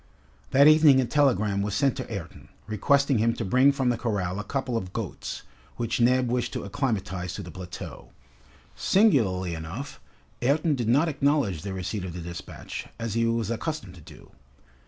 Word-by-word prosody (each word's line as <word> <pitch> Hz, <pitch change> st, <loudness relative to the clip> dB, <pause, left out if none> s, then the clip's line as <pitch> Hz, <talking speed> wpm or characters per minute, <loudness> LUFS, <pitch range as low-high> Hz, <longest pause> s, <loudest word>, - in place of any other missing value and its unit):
That 140 Hz, +2 st, +6 dB
evening 155 Hz, -3 st, +7 dB
a 130 Hz, -, +2 dB
telegram 115 Hz, -7 st, +2 dB
was 100 Hz, 0 st, -2 dB
sent 140 Hz, -3 st, +2 dB
to -, -, -6 dB
Ayrton, 95 Hz, -5 st, -7 dB, 0.2 s
requesting 140 Hz, +5 st, +2 dB
him 115 Hz, +1 st, +2 dB
to -, -, -3 dB
bring 130 Hz, +8 st, +5 dB
from 135 Hz, -2 st, 0 dB
the 120 Hz, -1 st, 0 dB
corral 100 Hz, -5 st, -2 dB
a -, -, -3 dB
couple 130 Hz, -1 st, -3 dB
of 95 Hz, -5 st, -3 dB
goats, -, -, -5 dB, 0.3 s
which 120 Hz, 0 st, -1 dB
Neb 125 Hz, +1 st, +4 dB
wished 120 Hz, 0 st, -1 dB
to -, -, -3 dB
acclimatize 100 Hz, -5 st, -2 dB
to 100 Hz, -, -6 dB
the 90 Hz, -, -9 dB
plateau. 90 Hz, +2 st, -9 dB, 0.7 s
Singularly 105 Hz, -, +2 dB
enough, 85 Hz, -, -6 dB, 0.4 s
Ayrton 150 Hz, +5 st, +2 dB
did 120 Hz, -5 st, -2 dB
not 145 Hz, +8 st, +4 dB
acknowledge 140 Hz, -, +1 dB
the 100 Hz, -, -5 dB
receipt 95 Hz, +2 st, -4 dB
of 90 Hz, -3 st, -5 dB
the 90 Hz, -, -6 dB
despatch, 85 Hz, 0 st, -7 dB
as 115 Hz, -2 st, -3 dB
he 115 Hz, 0 st, +1 dB
was 115 Hz, -1 st, 0 dB
accustomed 115 Hz, -, -4 dB
to 90 Hz, -, -14 dB
do. 75 Hz, -1 st, -15 dB
115 Hz, 175 wpm, -26 LUFS, 95-135 Hz, 0.7 s, evening